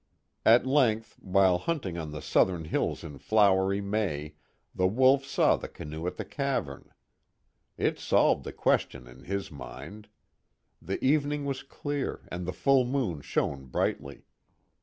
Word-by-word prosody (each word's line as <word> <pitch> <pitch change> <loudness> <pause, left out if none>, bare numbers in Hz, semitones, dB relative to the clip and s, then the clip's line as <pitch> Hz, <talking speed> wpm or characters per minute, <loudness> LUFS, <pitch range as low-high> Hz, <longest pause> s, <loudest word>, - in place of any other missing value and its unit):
At 115 +3 +6
length, 125 -5 +1
while 95 -2 +3
hunting 135 - -3
on 80 -3 -5
the 75 -2 -7
southern 90 -4 +2
hills - - -1
in 70 -2 -9
flowery 100 -1 +3
May, 100 -8 -2 0.4
the 90 - +2
Wolf 130 +6 +4
saw 135 - +2
the - - -7
canoe 80 +3 -7
at - - -4
the - - -4
cavern. 135 - -3 0.9
It - - 0
solved - - +3
the - - -6
question 60 - 0
in 65 +2 -15
his 100 -1 -3
mind. 75 - -10 0.7
The - - -4
evening 145 +1 +1
was 135 -1 -3
clear, 145 0 -4
and 85 0 -5
the - - -1
full 135 +5 +3
moon 120 - -2
shone 70 -1 -2
brightly. 70 +2 -2
100 Hz, 145 wpm, -28 LUFS, 80-130 Hz, 0.9 s, At